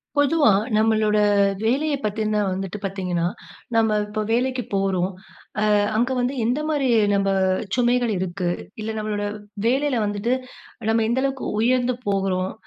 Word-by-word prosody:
பொதுவா 290 -4 +4 0.3
நம்மளோட 215 -1 +2 0.5
வேலையப் 280 +4 0
பத்தின 215 0 0
வந்துட்டு 190 +1 -4
பார்த்தீங்கன்னா, 180 -3 -2 0.5
நம்ம 220 -2 +3
இப்ப 210 +1 -3
வேலைக்கு 250 +2 0
போறோம். 190 -1 0 0.6
அ, - - +5 0.2
அங்க 240 +3 +1
வந்து 250 +2 0
எந்த 245 +6 0
மாதிரி 285 -4 +1 0.3
நம்ம 195 0 +1 0.5
சுமைகள் 245 -1 +2
இருக்கு? 180 0 -2 0.3
இல்ல, 220 - -3
நம்மளோட 210 -1 -2 0.4
வேலையில 265 0 +1
வந்துட்டு 205 +4 -1 0.6
நம்ம 225 0 +2
எந்த 250 +2 +1
அளவுக்கு 270 -1 -2 0.2
உயர்ந்து 250 +2 +2
போகிறோம்? 190 -2 0
220 Hz, 130 wpm, -23 LUFS, 195-250 Hz, 0.6 s, அ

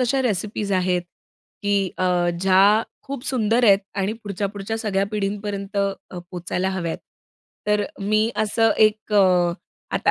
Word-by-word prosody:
अशा 255 +2 +2
रेसिपीज 210 -2 -2
आहेत 180 -1 +1 0.6
की 200 -2 +1
अ, 180 -1 +2
ज्या 195 +3 +5 0.2
खूप 275 -2 -6
सुंदर 235 -1 +2
आहेत 200 -2 +7 0.2
आणि 195 +2 0
पुढच्या-पुढच्या 200 +2 -3
सगळ्या 200 -3 0
पिढींपर्यंत 200 -1 -3
अ, 195 -2 -2
पोहचायला 180 +1 -2
हव्यात. 175 -3 -3 0.7
तर 210 -1 +2 0.2
मी 215 +3 +2
असं 220 +1 +2
एक 215 0 +2
अ, 180 -4 +4 0.4
आता - - +2
200 Hz, 130 wpm, -22 LUFS, 190-215 Hz, 0.7 s, आहेत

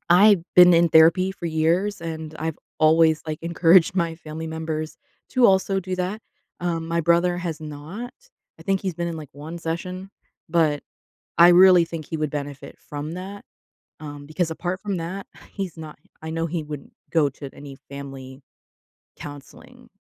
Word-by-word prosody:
I've 195 +1 +6
been 180 -1 +8
in 170 0 +4
therapy 165 +4 +5
for 175 -2 -6
years, 170 +6 0
and 160 -2 -6
I've 160 -1 -3 0.2
always, 160 0 +4
like, 155 -1 -4
encouraged 170 +1 +4
my 170 -2 0
family 160 0 -7
members 160 -1 -4 0.3
to 255 -2 +5
also 195 0 +2
do 185 0 -4
that. 185 +4 -3 0.4
Um, 170 -2 -2
my 170 +1 0
brother 170 +2 +2
has 170 -3 -4
not. 155 +11 -7 0.5
I - - -10
think 195 -1 0
he's 190 -3 -3
been 170 +1 -3
in, 165 - -5
like, 150 -3 -9
1 155 +4 -8
session, 180 +3 -5 0.4
but 155 -3 +2 0.6
I 170 +1 +9
really 180 -1 +7
think 165 -2 -7
he 160 - -4
would 155 -2 -2
benefit 145 -1 -6
from 150 +1 -6
that. 195 +3 -8 0.6
Um, 145 -2 -8
because 160 +2 -1
apart 180 +3 -4
from 200 -2 -3
that, 180 +4 -5 0.3
he's 190 -5 -5
not, 155 -2 -9 0.2
I 160 - -5
know 165 0 -1
he 165 -1 -3
wouldn't 150 -2 -8 0.2
go 155 -4 +3
to 140 0 -9
any 140 -1 -11
family 135 -1 -9 0.8
counseling, 145 -2 -12
165 Hz, 170 wpm, -23 LUFS, 155-180 Hz, 0.8 s, I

